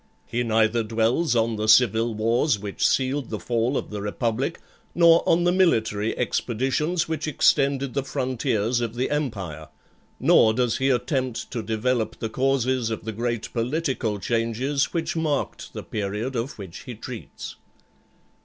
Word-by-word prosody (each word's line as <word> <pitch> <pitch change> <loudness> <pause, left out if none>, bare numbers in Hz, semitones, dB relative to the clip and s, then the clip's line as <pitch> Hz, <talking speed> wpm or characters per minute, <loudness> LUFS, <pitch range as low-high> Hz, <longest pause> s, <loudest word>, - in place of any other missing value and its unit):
He 120 - -2
neither 115 0 +2
dwells 115 +6 +1
on 115 -1 +1
the 105 0 -2
civil 115 0 +4
wars 115 +4 +2
which 100 -1 0
sealed 135 0 0
the 110 - -4
fall 120 +6 0
of - - -5
the 105 -1 -4
Republic, 115 +8 -2 0.4
nor 170 -1 +6
on 170 +1 +4
the 175 - +3
military 110 - +1
expeditions 135 +8 0
which 160 -1 -3
extended 140 -2 +2
the 140 - 0
frontiers 120 -3 -1
of 115 -1 -3
the 125 +2 -1
empire; 100 - -3 0.5
nor 110 -1 +5
does 125 -2 +1
he 135 +1 +2
attempt 130 -1 -1
to 120 - -3
develop 110 +2 -1
the 115 - -3
causes 130 -1 +1
of 110 -1 -5
the 110 - -2
great 115 0 -3
political 125 -3 -1
changes 115 +7 0
which 165 -1 -2
marked 155 -3 -2
the - - -6
period 105 +5 -3
of 120 +5 -3
which 95 -5 -8
he 125 - -7
treats. 120 +1 -8
120 Hz, 155 wpm, -24 LUFS, 110-135 Hz, 0.5 s, nor